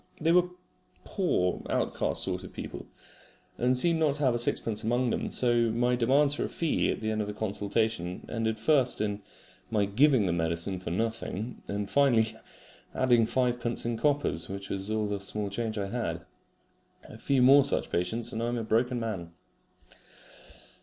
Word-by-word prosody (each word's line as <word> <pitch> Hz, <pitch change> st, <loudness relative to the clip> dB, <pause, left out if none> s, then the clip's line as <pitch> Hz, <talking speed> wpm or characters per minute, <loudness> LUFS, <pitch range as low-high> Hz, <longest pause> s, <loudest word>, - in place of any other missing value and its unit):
They 160 Hz, +1 st, +2 dB
were 180 Hz, +1 st, +4 dB, 0.5 s
poor 90 Hz, -, 0 dB
outcast -, -, 0 dB
sort -, -, -2 dB
of -, -, -9 dB
people, -, -, -8 dB, 0.7 s
and 125 Hz, +1 st, +2 dB
seemed 165 Hz, +5 st, +2 dB
not 150 Hz, -3 st, +2 dB
to 150 Hz, -, -2 dB
have 120 Hz, -3 st, +3 dB
sixpence 110 Hz, -2 st, 0 dB
among 120 Hz, +2 st, +1 dB
them; -, -, -2 dB
so 120 Hz, -2 st, +2 dB
my 120 Hz, +2 st, +1 dB
demands 135 Hz, +4 st, +3 dB
for -, -, -2 dB
a -, -, -5 dB
fee 165 Hz, -2 st, 0 dB
at -, -, -2 dB
the 110 Hz, 0 st, -1 dB
end 110 Hz, 0 st, -1 dB
of 105 Hz, -, -3 dB
the 105 Hz, -, -5 dB
consultation 105 Hz, -3 st, -2 dB
ended 110 Hz, -1 st, -2 dB
first 130 Hz, +2 st, +2 dB
in 105 Hz, -1 st, -2 dB, 0.5 s
my 105 Hz, -2 st, +1 dB
giving 125 Hz, +2 st, +3 dB
the 90 Hz, -, 0 dB
medicine 85 Hz, +2 st, -2 dB
for 90 Hz, -, -6 dB
nothing, 115 Hz, +3 st, -3 dB
and 100 Hz, 0 st, -3 dB
finally 115 Hz, -4 st, +3 dB, 0.6 s
adding 120 Hz, -3 st, +3 dB
fivepence 120 Hz, -1 st, -1 dB
in 120 Hz, 0 st, -1 dB
coppers, 140 Hz, -, 0 dB
which 100 Hz, 0 st, -6 dB
was 100 Hz, +1 st, -2 dB
all 110 Hz, 0 st, 0 dB
the 100 Hz, -1 st, -3 dB
small 100 Hz, +1 st, -3 dB
change 110 Hz, +1 st, -3 dB
I 100 Hz, -1 st, -2 dB
had. 120 Hz, +1 st, -3 dB, 0.8 s
A -, -, -13 dB
few 135 Hz, -2 st, +2 dB
more 140 Hz, +2 st, +7 dB
such 140 Hz, -, 0 dB
patients 90 Hz, +7 st, -1 dB
and 115 Hz, -, -3 dB
I 115 Hz, -, -1 dB
am 120 Hz, 0 st, -1 dB
a 115 Hz, -, -2 dB
broken 120 Hz, +3 st, +1 dB
man. 95 Hz, -7 st, -5 dB
115 Hz, 175 wpm, -28 LUFS, 105-125 Hz, 0.8 s, more